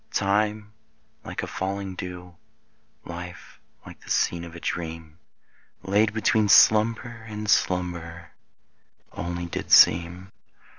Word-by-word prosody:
Time 105 +1 -1 0.5
like - - -6
a - - -4
falling 95 0 -4
dew, 90 -1 -8 0.7
Life 90 +1 -10 0.3
like - - -13
the - - -15
scene 85 -1 0
of 85 0 -10
a - - -8
dream 80 -1 -6 0.6
Laid 105 +3 +2
between 110 -1 +1
slumber 115 +3 +4
and 105 0 -6
slumber 85 -3 -1 0.8
Only 85 0 -5
did 85 - -6
seem. 85 +3 +5
90 Hz, 110 wpm, -25 LUFS, 85-105 Hz, 0.8 s, seem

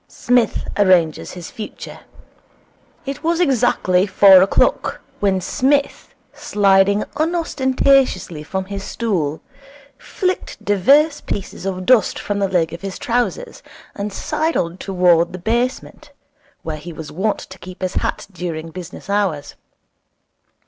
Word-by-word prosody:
Psmith 245 -2 0
Arranges 180 -6 +2
his 175 -2 -9
Future 220 -4 -8 1.1
It 280 +2 -6
was 335 +1 +1
exactly 235 - +2
four 190 -1 +7
o'clock 190 - +1 0.2
when 195 -2 +1
Psmith, 280 +9 -1 0.2
sliding 200 0 +2
unostentatiously 270 - +1
from 190 +5 -4
his 200 0 -6
stool, 175 -11 -2 0.6
flicked 370 -1 -3
divers 280 - +3
pieces 195 -1 -5
of 185 -1 -4
dust 245 0 +3
from 205 -1 -3
the 195 -1 0
leg 165 -3 0
of 170 - -8
his 195 -1 -5
trousers, 245 - -2 0.3
and 205 +1 -4
sidled 190 - -2
towards 180 -3 +2
the - - -5
basement, 245 - -3 0.5
where 155 -1 -4
he 160 +3 -9
was 160 -1 -9
wont 200 +4 -1
to 190 -1 -11
keep 185 +1 -10
his 185 - -2
hat - - -2
during 165 -3 -5
business 180 -1 -9
hours. 195 -8 -1
195 Hz, 125 wpm, -19 LUFS, 180-250 Hz, 1.1 s, four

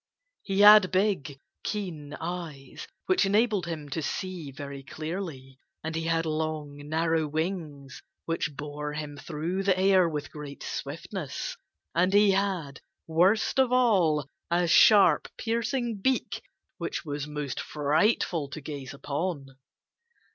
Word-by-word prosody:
He 195 0 0
had 210 -2 +9
big, 185 -8 0 0.2
keen 160 -8 -4
eyes 165 -5 -6 0.2
which 370 -8 +3
enabled 205 -2 +2
him 155 -3 -5
to 160 +4 -3
see 180 -1 -4
very 140 0 -7
clearly. 155 -3 -6 0.2
And 160 +1 -4
he 165 0 -2
had 165 0 +1
long, 155 -2 -3
narrow 160 0 +1
wings 155 -4 -4 0.2
which 165 -3 -2
bore 150 +1 -5
him 150 -1 -5
through 160 +5 -3
the 195 -1 +2
air 190 -2 +4
with 150 -2 -5
great 145 -2 -8
swiftness. - - -5 0.4
And 180 +3 +2
he 205 0 +6
had 190 -8 -1 0.2
worst 185 +10 +2
of 260 -2 +4
all 185 - +3 0.2
a 175 +1 +2
sharp, 205 +4 +6
piercing 235 0 -1
beak 260 +4 0 0.4
which - - -4
was 145 -1 -4
most 150 -3 -4
frightful 155 +1 +1
to 155 - -6
gaze 140 -3 -7
upon. 145 0 -3
160 Hz, 130 wpm, -28 LUFS, 145-195 Hz, 0.4 s, had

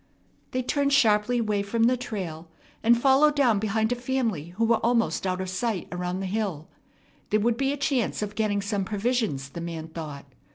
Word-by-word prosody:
They 255 0 -2
turned 280 +2 +1
sharply 225 -2 +4
away 210 -3 0
from 225 +3 0
the 245 +2 +4
trail, 185 -10 -5 0.3
and 235 +1 +4
followed 275 +3 +4
down 245 -8 +3
behind 220 +2 0
a - - +2
family 245 - -1
who 230 - +2
were 230 0 +4
almost 230 -4 +1
out 185 0 -1
of 190 - -3
sight 185 +1 -2
around 180 +1 -3
the - - -3
hill. 190 -6 -2 0.6
There 215 - +3
would 230 +2 +2
be 270 +3 0
a 285 - -3
chance 270 -7 0
of 205 -1 -4
getting 205 -2 0
some 200 -1 -1
provisions, 210 - -1
the 170 - -7
man 165 -1 -5
thought. 155 -4 -7
215 Hz, 195 wpm, -26 LUFS, 185-245 Hz, 0.6 s, sharply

